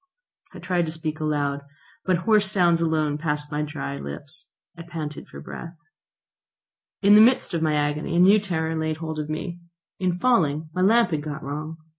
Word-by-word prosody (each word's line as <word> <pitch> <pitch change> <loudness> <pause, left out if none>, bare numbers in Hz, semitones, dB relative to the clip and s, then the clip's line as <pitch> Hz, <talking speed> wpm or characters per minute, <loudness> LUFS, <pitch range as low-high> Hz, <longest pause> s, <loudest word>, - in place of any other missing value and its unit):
I - - -7
tried 175 -1 -1
to - - -3
speak 160 -1 -4
aloud, 145 -2 -1 0.4
but 185 -1 +2
hoarse 210 -3 +4
sounds 175 -4 +3
alone 155 -3 0
passed 150 -1 -2
my 150 0 -1
dry 70 - -4
lips. 70 - -7 0.3
I 165 - -9
panted 160 -3 -6
for 70 - -11
breath. 165 - -8 1.3
In 200 +1 +7
the 210 - +9
midst 245 -3 +4
of 165 - 0
my 155 -1 +2
agony 150 +2 -1
a - - +3
new 195 +4 +7
terror 165 -5 -2
laid 160 -1 -1
hold 160 -1 -5
of 150 0 -4
me. 175 +3 -4 0.4
In 180 -2 0
falling 160 - +1
my 185 - -1
lamp 220 +1 +4
had 155 -2 -1
got 150 0 -6
wrong. 155 +3 -5
160 Hz, 185 wpm, -24 LUFS, 150-180 Hz, 1.3 s, the